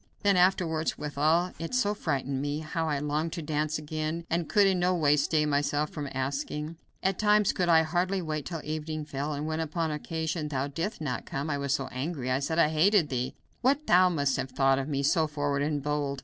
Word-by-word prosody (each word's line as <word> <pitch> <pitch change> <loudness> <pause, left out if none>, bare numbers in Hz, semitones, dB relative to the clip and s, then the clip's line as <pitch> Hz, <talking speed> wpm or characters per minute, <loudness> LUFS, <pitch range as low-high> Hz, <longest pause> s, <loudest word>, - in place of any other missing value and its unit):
Then 200 -1 +4
afterwards, 175 -3 +2
withal 155 +4 +1
it 165 +9 -3
so 210 -5 +2
frightened 140 -8 -2
me, 145 +2 -2
how 160 +1 -2
I 145 - 0
longed 150 +3 -1
to 170 - -4
dance 155 +1 -1
again, 155 +2 -4
and 170 0 0
could 205 -2 +5
in 190 -2 +2
no 180 +1 +2
way 150 -4 +4
stay 150 +1 +1
myself 145 +1 0
from 145 -3 -5
asking. 145 +4 -3 0.3
At 190 -1 0
times 210 -1 +4
could 180 -2 0
I 160 -1 +6
hardly 180 +4 0
wait 155 -4 -3
till 165 -3 -4
evening 155 0 -4
fell, 145 +1 -3
and 145 +1 -3
when 155 0 -2
upon 160 0 -1
occasion 160 +1 -3
thou 135 -2 -1
didst 165 +7 -4
not 125 -6 -3
come, 140 +3 -3
I 145 - -1
was 140 -1 +1
so 135 - -3
angry 130 -1 -3
I 130 - +2
said 160 +4 -2
I 160 -3 +5
hated 165 +1 +3
thee. 125 -2 -2 0.3
What 275 +5 +2
must 175 -7 +4
thou - - 0
have 130 - -6
thought 135 +1 +2
of 135 +2 -4
me, 140 -1 -1
so 155 +3 +3
forward 145 -1 -1
and 145 -1 -1
bold! 145 -1 -1
155 Hz, 220 wpm, -28 LUFS, 145-170 Hz, 0.3 s, I